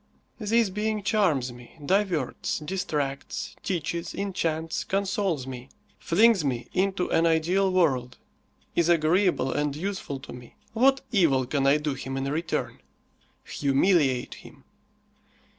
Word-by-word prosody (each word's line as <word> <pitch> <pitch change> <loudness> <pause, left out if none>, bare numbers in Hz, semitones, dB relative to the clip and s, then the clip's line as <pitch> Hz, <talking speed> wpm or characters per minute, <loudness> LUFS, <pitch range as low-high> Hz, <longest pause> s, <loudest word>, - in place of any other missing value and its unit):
This 225 -1 +2
being 210 +1 -2
charms 175 - +1
me, 120 +5 -15
diverts, 185 -7 0
distracts, 150 -4 -3
teaches, 170 -2 -3
enchants, 165 -5 -2
consoles 195 -7 -1
me; 130 0 -8 0.3
flings 215 +1 +4
me 125 -4 -2
into 190 -1 0
an 165 +1 +3
ideal 175 +4 +2
world, 135 -9 +1 0.6
is 170 0 +2
agreeable 170 -2 +2
and 145 -1 -1
useful 180 -5 -4
to - - -10
me. 125 -1 -12 0.2
What 270 +4 +4
evil 155 - +3
can 135 +1 0
I 140 +2 +5
do 150 -1 -2
him 135 0 -5
in 135 - -2
return? 165 +3 -2 0.6
Humiliate 140 -2 +1
him. 135 - -15
165 Hz, 125 wpm, -26 LUFS, 135-195 Hz, 0.6 s, I